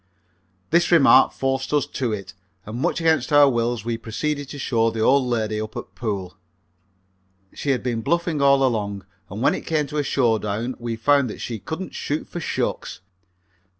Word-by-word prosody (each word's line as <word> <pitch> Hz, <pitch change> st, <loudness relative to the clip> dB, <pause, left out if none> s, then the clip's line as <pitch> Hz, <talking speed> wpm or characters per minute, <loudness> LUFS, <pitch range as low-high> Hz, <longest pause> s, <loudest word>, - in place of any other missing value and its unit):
This 170 Hz, +2 st, +3 dB
remark 135 Hz, -6 st, +6 dB
forced 135 Hz, 0 st, -2 dB
us 145 Hz, -2 st, +2 dB
to 125 Hz, -4 st, -3 dB
it, 100 Hz, -2 st, -5 dB, 0.3 s
and 110 Hz, +3 st, -6 dB
much 175 Hz, +2 st, 0 dB
against 160 Hz, -1 st, +1 dB
our 145 Hz, -1 st, +7 dB
wills 120 Hz, -3 st, 0 dB
we 115 Hz, -1 st, -2 dB
proceeded 145 Hz, +5 st, -3 dB
to 145 Hz, -, -7 dB
show 115 Hz, -4 st, +1 dB
the 110 Hz, -1 st, -4 dB
old 130 Hz, +3 st, +4 dB
lady 110 Hz, -3 st, -1 dB
up 110 Hz, 0 st, -6 dB
at -, -, -8 dB
pool. 100 Hz, -6 st, -4 dB, 1.2 s
She 145 Hz, -, -4 dB
had 130 Hz, -2 st, +1 dB
been 120 Hz, -3 st, -1 dB
bluffing 170 Hz, +2 st, 0 dB
all 140 Hz, -1 st, +5 dB
along, 100 Hz, -6 st, -1 dB, 0.2 s
and 105 Hz, +5 st, -5 dB
when 145 Hz, -, +4 dB
it -, -, -6 dB
came 155 Hz, -2 st, +1 dB
to 150 Hz, +2 st, -6 dB
a 145 Hz, -, +1 dB
showdown 115 Hz, -3 st, 0 dB
we 120 Hz, -1 st, -3 dB
found 140 Hz, +3 st, +2 dB
that -, -, -8 dB
she 115 Hz, -3 st, -5 dB
couldn't 165 Hz, -, -6 dB
shoot 150 Hz, +2 st, -3 dB
for 175 Hz, -, -6 dB
shucks. 160 Hz, -, -3 dB
125 Hz, 185 wpm, -23 LUFS, 110-145 Hz, 1.2 s, our